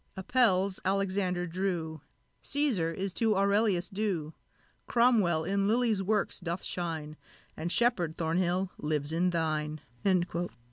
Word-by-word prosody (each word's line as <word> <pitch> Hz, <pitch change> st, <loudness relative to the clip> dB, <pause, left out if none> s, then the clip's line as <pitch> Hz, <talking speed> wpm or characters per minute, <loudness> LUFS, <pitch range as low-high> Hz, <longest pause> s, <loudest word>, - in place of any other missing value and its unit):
Apelles 195 Hz, -3 st, +2 dB
Alexander 190 Hz, -2 st, 0 dB
drew 170 Hz, -3 st, -3 dB, 0.4 s
Cæsar 255 Hz, -, +1 dB
is 190 Hz, +2 st, -3 dB
to 220 Hz, 0 st, +2 dB
Aurelius 200 Hz, -2 st, +2 dB
due; 190 Hz, -7 st, -2 dB, 0.5 s
Cromwell 220 Hz, -10 st, +3 dB
in 195 Hz, +3 st, 0 dB
Lilly's 225 Hz, -2 st, +2 dB
works 205 Hz, +1 st, 0 dB
doth 175 Hz, -1 st, -4 dB
shine, 160 Hz, -3 st, -3 dB, 0.4 s
And 170 Hz, +2 st, -3 dB
Sheppard, 180 Hz, -10 st, +2 dB
Thornhill, 180 Hz, +3 st, 0 dB
lives 150 Hz, -1 st, -1 dB
in 175 Hz, +3 st, +2 dB
thine!" 155 Hz, -2 st, -1 dB
185 Hz, 110 wpm, -30 LUFS, 165-200 Hz, 0.5 s, Cromwell